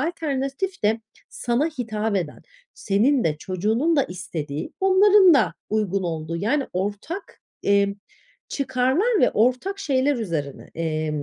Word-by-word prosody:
alternatif 310 Hz, +3 st, -2 dB
de 220 Hz, +2 st, +2 dB, 0.3 s
sana 245 Hz, +5 st, 0 dB
hitap 225 Hz, -8 st, -2 dB
eden, 170 Hz, -6 st, -4 dB, 0.3 s
senin 230 Hz, +6 st, +2 dB
de 155 Hz, -2 st, +1 dB
çocuğunun 220 Hz, -, 0 dB
da 280 Hz, -, +4 dB
istediği, 155 Hz, -5 st, -5 dB
onların 385 Hz, -1 st, +6 dB
da 200 Hz, -, +2 dB, 0.2 s
uygun 200 Hz, -3 st, 0 dB
olduğu 165 Hz, -1 st, -3 dB
yani 240 Hz, -, 0 dB
ortak, 205 Hz, -, -4 dB, 0.2 s
emm, 200 Hz, 0 st, +2 dB, 0.5 s
çıkarlar 275 Hz, -, +1 dB
ve -, -, +4 dB
ortak 255 Hz, -, +1 dB
şeyler 280 Hz, -4 st, +1 dB
üzerine, 165 Hz, -, -4 dB
emm, 155 Hz, -2 st, -2 dB
225 Hz, 125 wpm, -23 LUFS, 185-290 Hz, 0.5 s, onların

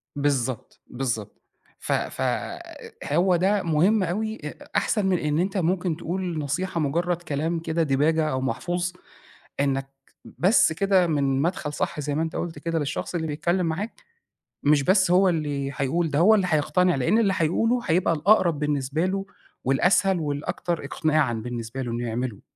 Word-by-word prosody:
بالضبط، 135 Hz, -5 st, -2 dB
بالضبط 120 Hz, -5 st, -4 dB, 0.4 s
ف -, -, -5 dB
ف -, -, -1 dB, 0.9 s
هو 180 Hz, 0 st, +3 dB
ده 195 Hz, +3 st, +2 dB
مهم 180 Hz, +6 st, +3 dB
أوي 215 Hz, +5 st, -2 dB
أ 150 Hz, -, -8 dB
أحسن 210 Hz, -3 st, +1 dB
من 190 Hz, -1 st, +2 dB
إن 150 Hz, -1 st, 0 dB
أنت 190 Hz, +3 st, -1 dB
ممكن 180 Hz, -2 st, 0 dB
تقول 175 Hz, -1 st, -3 dB
نصيحة 165 Hz, +5 st, -2 dB
مجرّد 170 Hz, +4 st, 0 dB
كلام 160 Hz, +1 st, -2 dB
كده 165 Hz, 0 st, -1 dB
ديباجة 155 Hz, +3 st, +2 dB
أو 130 Hz, -2 st, -1 dB
محفوظ 175 Hz, +8 st, -2 dB, 0.7 s
إنك 135 Hz, -1 st, 0 dB, 0.5 s
بس 185 Hz, -3 st, +4 dB
كده 190 Hz, 0 st, +3 dB
من 140 Hz, -4 st, +1 dB
مدخل 160 Hz, -2 st, -2 dB
صح 155 Hz, -, -2 dB
زي 145 Hz, 0 st, -2 dB
ما 155 Hz, -, 0 dB
أنت 160 Hz, -1 st, -3 dB
قُلت 165 Hz, -4 st, -4 dB
كده 165 Hz, +1 st, -1 dB
للشخص 145 Hz, +4 st, -3 dB
اللي 160 Hz, -2 st, -1 dB
بيتكلم 170 Hz, +4 st, 0 dB
معاك، 195 Hz, +8 st, -4 dB, 0.6 s
مش 145 Hz, -1 st, +4 dB
بس 190 Hz, +3 st, +3 dB
هو 185 Hz, +2 st, +5 dB
اللي 145 Hz, -5 st, -1 dB
هيقول 150 Hz, +4 st, 0 dB
ده 140 Hz, -, 0 dB
هو 210 Hz, +7 st, +6 dB
اللي 195 Hz, -3 st, +2 dB
هيقتنع 175 Hz, +4 st, +2 dB
لأن 135 Hz, -, +2 dB
اللي 205 Hz, -4 st, +3 dB
هيقوله 225 Hz, +9 st, +1 dB
هيبقى 170 Hz, -1 st, +2 dB
الأقرب 170 Hz, -1 st, +3 dB
بالنسبة 150 Hz, +2 st, 0 dB
له 195 Hz, +1 st, -2 dB, 0.4 s
والأسهل 180 Hz, +7 st, +3 dB
والأكتر 155 Hz, +2 st, -3 dB
إقناعًا 155 Hz, -2 st, +1 dB
بالنسبة 120 Hz, +2 st, -5 dB
له 120 Hz, -2 st, -4 dB
إنه 120 Hz, +1 st, -2 dB
يعمله. 120 Hz, -2 st, -3 dB
160 Hz, 160 wpm, -25 LUFS, 140-180 Hz, 0.9 s, هو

